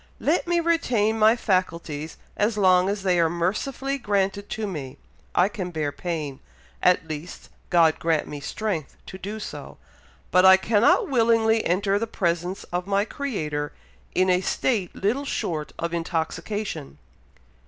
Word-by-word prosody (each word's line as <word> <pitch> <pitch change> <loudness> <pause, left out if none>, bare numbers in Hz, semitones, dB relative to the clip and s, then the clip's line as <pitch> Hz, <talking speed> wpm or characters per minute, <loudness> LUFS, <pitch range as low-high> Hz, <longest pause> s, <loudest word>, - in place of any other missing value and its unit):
Let 330 +4 +1
me 345 0 +2
retain 240 -10 +1
my 220 +2 +6
faculties 170 -8 -2 0.2
as 210 +1 +1
long 185 -1 +4
as 200 -1 -2
they 180 -2 +2
are 165 -1 +4
mercifully 255 - -2
granted 200 -2 -1
to 220 - -3
me. 145 -8 -6 0.4
I 180 - +5
can 200 -4 -5
bear 155 -4 -2
pain, 150 -3 -4 0.4
at 180 -2 +3
least, 155 +3 -7 0.2
God 165 -3 +4
grant 160 -2 +1
me 145 - -6
strength 170 +1 -4
to 190 - -9
do 205 +4 -5
so, 145 -9 -8 0.5
but 185 +1 +5
I 190 0 +9
cannot 225 - +3
willingly 225 -4 +3
enter 195 +3 +1
the 230 - -2
presence 175 -2 -1
of 180 +1 -2
my 200 +1 +2
Creator 155 - -3 0.4
in 185 +1 +3
a 180 0 +3
state 200 -2 -1
little 230 +9 0
short 160 - -3
of 170 0 -3
intoxication." 165 - -3
190 Hz, 150 wpm, -24 LUFS, 165-220 Hz, 0.5 s, I